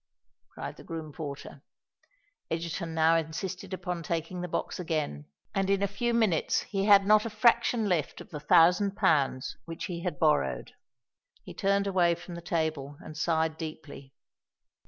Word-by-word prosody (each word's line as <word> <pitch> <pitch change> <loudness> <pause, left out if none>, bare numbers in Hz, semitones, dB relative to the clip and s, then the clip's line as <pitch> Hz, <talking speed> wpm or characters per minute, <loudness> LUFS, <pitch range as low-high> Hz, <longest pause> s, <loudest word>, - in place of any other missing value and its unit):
cried - - -6
the - - -12
groom 160 -2 -6
porter. 140 -2 -7 0.9
Egerton 165 0 -3
now 160 +1 +4
insisted 175 +4 -3
upon 180 -2 -3
taking 165 +2 -3
the 180 - -3
box 175 - -3
again; 155 - -2 0.3
and 195 -1 0
in 200 0 +2
a - - +3
few 220 +5 -1
minutes 220 -9 +2
he 195 -1 -2
had 200 -2 +7
not 215 +1 +5
a 230 - -3
fraction 225 0 +3
left 170 -6 -1
of - - -12
the 150 - -5
thousand 180 +7 +4
pounds 145 -10 +1
which 165 -1 -6
he 175 -3 -5
had 180 0 -3
borrowed. 65 - +1 0.7
He - - -9
turned 200 0 +1
away 180 -3 +3
from 175 +1 -10
the 170 - -7
table 155 -4 -2
and 155 - -10
sighed 160 0 0
deeply. 155 -4 -8
170 Hz, 160 wpm, -29 LUFS, 155-195 Hz, 0.9 s, had